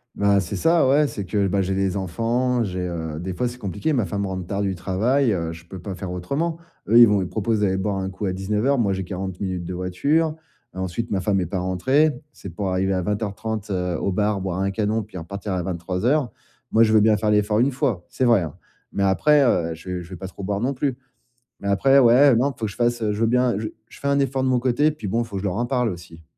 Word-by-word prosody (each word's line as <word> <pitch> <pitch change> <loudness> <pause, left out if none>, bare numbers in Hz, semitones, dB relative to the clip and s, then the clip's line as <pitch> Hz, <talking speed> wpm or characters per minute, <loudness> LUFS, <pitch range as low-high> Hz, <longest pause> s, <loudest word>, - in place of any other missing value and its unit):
Bah, 100 -1 +3
c'est 90 - -3
ça, 165 -3 +3
ouais, 145 +3 +4
c'est 100 - -5
que, 100 +1 0
bah, 100 +1 +1
j'ai 95 0 -1
les 95 0 0
enfants, 115 +6 0
j'ai, 95 -3 -4
heu 80 -3 -4
des 90 +2 -4
fois, 125 - 0
c'est 125 +1 -8
compliqué, 100 - -2
ma 120 -8 +1
femme 100 -1 -2
rentre 95 -2 -4
tard 100 +1 -2
du 95 -1 0
travail, 110 +8 +1
heu, 85 -4 -1
je 80 +1 -12
peux 95 +2 -9
pas 95 +2 -6
faire 90 0 -6
autrement. 140 - -2 0.3
Eux, 115 +4 +5
ils 120 -1 +10
vont 105 -2 +2
ils 90 - -2
proposent 110 0 0
d'aller 95 -2 +1
boire 100 +1 -1
un 95 0 -2
coup 95 +2 -5
à 95 - -1
19:00, 105 +8 0
moi, 100 -4 +2
j'ai 95 0 -3
40 95 0 -5
minutes 95 -3 -3
de 90 - -5
voiture, 140 - +1 0.5
heu, - - -6
ensuite, 95 +6 -3
ma 95 -2 0
femme 100 0 +1
est 90 - -1
pas 90 +2 -3
rentrée, 130 - +2 0.2
si - - -20
c'est 100 - -6
pour 95 +3 -3
arriver 95 +1 +1
à 95 - 0
20:30, 105 +1 -3
heu, 90 -3 -1
au 100 - -1
bar, 105 0 0
boire 95 0 -2
un 100 0 0
canon, 110 +2 0
puis 100 -2 -11
repartir 100 +4 -5
à 90 - -1
23:00. 95 - -1 0.4
Moi, 110 - +4
je 110 -1 +3
veux 110 - +7
bien 110 0 +5
faire 105 +1 0
l'effort, 105 +1 +2
une 130 +3 +3
fois, 125 - -1
c'est 130 - -1
vrai, 115 -6 +5
hein, 80 -4 -5 0.4
mais 100 - 0
après, 145 +10 +4
heu, 85 -10 +1
je 80 +3 -11
vais 90 -1 -3
je 85 - -14
vais 95 - -7
pas 95 +1 -7
trop 100 - -10
boire 100 +1 -2
non 135 +3 0
plus. 130 -1 -2 0.6
Mais 100 - -5
après, 135 +8 +4
ouais, 130 +3 +6
non, 135 +4 +1
faut 115 - -9
que 105 - -3
je - - -14
fasse, 120 0 +1
heu, 105 -1 +1
je 105 - -4
veux 115 - +3
bien 125 -3 +2
je 110 - -3 0.2
je - - -14
fais 140 - -3
un 140 0 +2
effort 135 -1 0
de - - +1
mon 125 -1 +2
côté, 130 +4 +2
puis 115 -9 -7
bon, 115 +5 0
faut 110 -3 -9
que 95 - -2
je 100 - -1
leur 90 - -2
en 120 - 0
parle 125 -2 0
aussi. 85 -2 -9
100 Hz, 275 wpm, -23 LUFS, 95-120 Hz, 0.6 s, ils